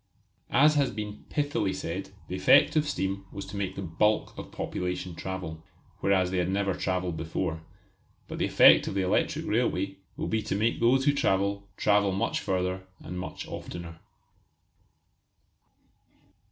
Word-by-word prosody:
As 150 +5 +5
has 140 -3 +2
been 105 0 -6
pithily 145 -10 0
said, 90 +4 -4 0.2
the 90 - -4
effect 95 +10 +5
of 150 -1 +2
steam 95 -5 -2
was 100 0 -6
to 95 - -9
make 95 -2 -3
the 100 - -5
bulk 105 +6 +1
of - - -9
population 90 0 -3
travel, 85 -3 -6 0.4
whereas 95 -2 +2
they 95 - 0
had 90 0 0
never 100 0 0
travelled 90 -2 -2
before, 80 0 -3 0.7
but - - -6
the - - +2
effect - - +7
of - - -3
the 95 - +1
electric 90 - 0
railway 100 -4 0 0.2
will - - -2
be 110 - 0
to 100 - -2
make 110 +3 +1
those 130 +3 +3
who 145 - +4
travel 100 -5 0
travel 100 -1 +3
much 95 +1 0
further 95 0 -2
and 90 +2 -6
much 90 - -6
oftener. 85 -2 -7
95 Hz, 155 wpm, -28 LUFS, 90-105 Hz, 0.7 s, effect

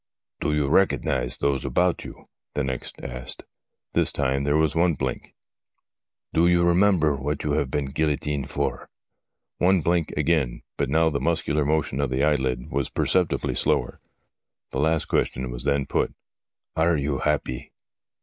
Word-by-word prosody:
' - - -68
Do - - 0
you 75 -2 +1
recognise 70 -7 +2
those 70 -2 0
about 85 +7 +1
you? - - -11
' - - -53
was 75 - 0
next 65 -1 -4
asked. 65 +1 -5 0.5
This - - +4
time 70 0 0
there 75 +1 +2
was 80 0 +2
one 85 -1 +3
blink. - - -4 0.5
' - - -58
Do 85 +2 +4
you 85 0 +4
remember 85 -4 +4
what 70 +2 -3
you 75 - -1
have 70 -2 0
been 70 -1 -2
guillotined 75 -2 -1
for? - - -3 0.3
' - - -59
One 95 -2 +4
blink 85 0 +1
again, 75 -8 +1
but - - -1
now 80 +2 +3
the 70 - -1
muscular 75 0 0
motion 75 -2 0
of 70 - 0
the 65 +2 0
eye 75 0 +4
lid 65 -3 -2
was 70 -2 -1
perceptibly 90 -2 +1
slower. 70 -5 0 0.7
The 65 - -1
last 80 0 +2
question 65 -1 -1
was - - -3
then 70 -1 +1
put: - - -1 0.3
' - - -61
Are 80 +1 +3
you 70 -1 -1
happy 75 -4 -2
75 Hz, 175 wpm, -25 LUFS, 65-80 Hz, 0.7 s, This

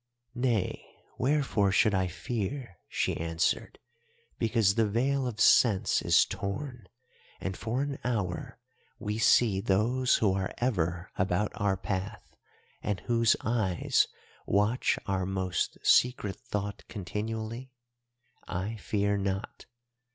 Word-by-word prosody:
"'Nay, 120 -5 0 0.4
wherefore 130 -8 +2
should 105 +2 +4
I 95 -1 +1
fear,' 105 - -4
she - - 0
answered, 80 +1 -1 0.6
'because 110 -3 +3
the 110 +1 +2
veil 130 +5 +1
of 115 -3 -5
sense 110 -3 +4
is - - +5
torn, 120 +2 -5 0.5
and 95 0 -3
for 120 +8 -2
an 140 -1 -4
hour 105 -8 -2 0.4
we 105 +1 -3
see 110 -3 +4
those 115 +6 +2
who 100 -4 +2
are 95 -1 -2
ever 90 -7 -1
about 95 +2 +1
our 100 -2 0
path 95 +2 -5 0.5
and 105 -3 -2
whose 115 0 +3
eyes 110 -7 +1 0.4
watch 105 +5 +2
our 95 -1 -1
most 95 -2 -1
secret 120 -6 +3
thought 105 -5 -4
continually? 110 +5 -5 0.8
I 100 +5 -3
fear 100 -1 0
not. 95 +2 -4
105 Hz, 115 wpm, -29 LUFS, 95-120 Hz, 0.8 s, is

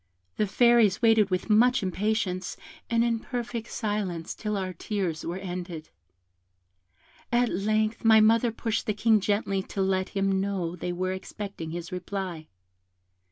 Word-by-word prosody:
The 210 - +1
Fairies 235 -1 +4
waited 225 -3 +5
with 185 -1 -1
much 230 +2 +4
impatience, 190 -1 -1 0.3
and 230 0 +3
in 230 -1 +1
perfect 240 -1 -5
silence, 200 -6 -2
till 210 -2 -3
our 185 -1 -3
tears 180 -3 -3
were 170 +2 -3
ended. 175 -4 -6 1.4
At 240 0 +3
length 215 +3 0
my 220 -1 +7
mother 225 +2 +4
pushed 225 0 -2
the 215 - 0
King 220 0 +4
gently 200 -1 0
to 195 - -8
let 190 0 0
him 195 -1 +1
know 190 -4 -2
they 180 0 -4
were 185 +1 -2
expecting 190 -2 -6
his 170 +1 -6
reply. 180 -3 -5
200 Hz, 145 wpm, -27 LUFS, 185-220 Hz, 1.4 s, my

